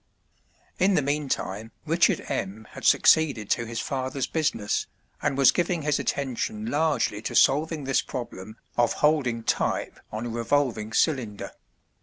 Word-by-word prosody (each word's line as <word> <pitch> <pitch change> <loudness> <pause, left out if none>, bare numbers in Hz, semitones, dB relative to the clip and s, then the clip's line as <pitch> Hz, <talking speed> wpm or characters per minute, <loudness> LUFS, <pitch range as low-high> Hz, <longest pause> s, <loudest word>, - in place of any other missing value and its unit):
In 190 +1 +4
the 150 - +2
meantime 135 -7 -2
Richard - - +2
M. 110 +3 -4
had - - -9
succeeded 140 -10 +4
to 120 -1 +1
his 115 0 -4
father's 130 0 -2
business, 130 -10 -1 0.3
and 135 - 0
was 135 -2 +6
giving 175 -2 -1
his 150 -1 +1
attention 120 -6 -2
largely 145 -6 0
to - - -4
solving 150 +2 +3
this 135 0 +1
problem 110 -4 -7 0.2
of 120 -1 +3
holding 135 -7 +1
type - - -1
on 110 +2 -4
a - - -3
revolving 115 -2 0
cylinder. 115 -6 0
130 Hz, 140 wpm, -26 LUFS, 110-150 Hz, 0.3 s, was